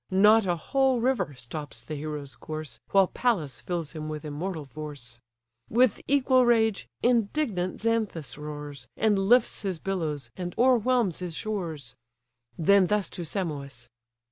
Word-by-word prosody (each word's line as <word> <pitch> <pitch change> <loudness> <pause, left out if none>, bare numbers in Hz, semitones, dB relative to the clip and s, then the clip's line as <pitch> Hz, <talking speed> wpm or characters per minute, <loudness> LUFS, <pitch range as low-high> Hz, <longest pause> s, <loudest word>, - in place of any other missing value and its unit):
Not 210 +2 +5
a 175 - +2
whole 265 - +1
river 245 - 0
stops 145 +5 -7
the 155 - -6
hero's 150 -2 -5
course, 155 -7 -7
While 195 -1 +5
Pallas 175 - -1
fills 170 -4 -3
him 155 -1 -6
with 155 0 -5
immortal 155 +2 -4
force. 135 -4 -8 0.5
With 240 -1 +3
equal 260 -2 +4
rage, 225 - +2 0.2
indignant 230 -5 +1
Xanthus 210 - -1
roars, 145 -3 -7
And 210 -2 +3
lifts 230 +5 +3
his 190 -4 -2
billows, 155 -9 -3
and 175 -1 -5
o'erwhelms 245 -5 +3
his 175 -3 -5
shores. 175 -9 -4 0.6
Then 190 +3 +5
thus 210 -2 0
to 175 - -5
Simois! 145 - -5
175 Hz, 140 wpm, -27 LUFS, 150-220 Hz, 0.6 s, Not